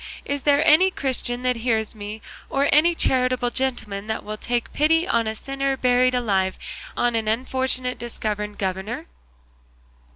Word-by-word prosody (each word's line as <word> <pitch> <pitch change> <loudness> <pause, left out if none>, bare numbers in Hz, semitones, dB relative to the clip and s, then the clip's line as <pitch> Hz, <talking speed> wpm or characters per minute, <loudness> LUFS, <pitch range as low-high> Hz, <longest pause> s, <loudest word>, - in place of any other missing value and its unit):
is 285 0 -2
there 290 +2 +3
any 330 +6 +6
Christian 255 -6 -2
that 250 -1 +1
hears 225 -2 0
me, 215 0 -8 0.3
or 275 +1 +1
any 335 +4 +5
charitable 255 -4 +1
gentleman 220 -6 -2
that 220 - -3
will 215 +1 -5
take 240 +2 -3
pity 325 +4 +3
on 230 -11 +1
a 220 - -2
sinner 275 +3 -2
buried 255 0 +3
alive, 195 -6 0 0.4
on 240 0 +2
an 220 -1 -1
unfortunate 255 +2 0
disgoverned 210 -3 -4
governor?" 190 +3 -3
245 Hz, 150 wpm, -23 LUFS, 220-270 Hz, 0.4 s, any